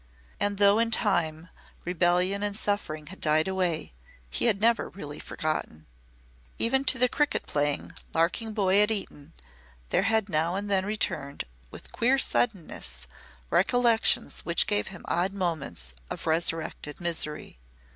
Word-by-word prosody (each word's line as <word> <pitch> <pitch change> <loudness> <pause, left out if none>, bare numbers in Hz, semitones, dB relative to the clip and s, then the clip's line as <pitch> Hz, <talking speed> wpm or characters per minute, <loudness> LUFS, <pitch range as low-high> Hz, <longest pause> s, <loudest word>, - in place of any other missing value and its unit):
And 205 0 0
though, 200 +1 +5
in 230 0 +2
time, 170 -7 0 0.4
rebellion 180 +3 +2
and 205 0 -1
suffering 155 -8 -2
had - - -14
died 155 +1 +3
away, 180 - -1 0.4
he - - 0
had 215 -4 +3
never 230 +2 +2
really 150 -6 -8
forgotten. 155 - -4 0.7
Even 265 +4 +2
to 260 - +4
the 250 0 +4
cricket 295 +3 0
playing, 145 -1 -1 0.2
larking 180 +8 0
boy 200 -1 +3
at 210 - +4
Eton 195 -9 -4 0.6
there - - +2
had 220 -2 +2
now 165 0 +1
and 200 +1 -3
then 190 0 +2
returned, 145 -9 -2 0.3
with - - -11
queer 255 +4 +2
suddenness, 170 - -1 0.5
recollections 235 +2 +3
which 170 - +1
gave 205 -1 0
him 185 -2 -10
odd 180 +3 0
moments 160 - -3 0.2
of - - -5
resurrected 160 -2 0
misery. 160 - -1
190 Hz, 140 wpm, -27 LUFS, 160-210 Hz, 0.7 s, though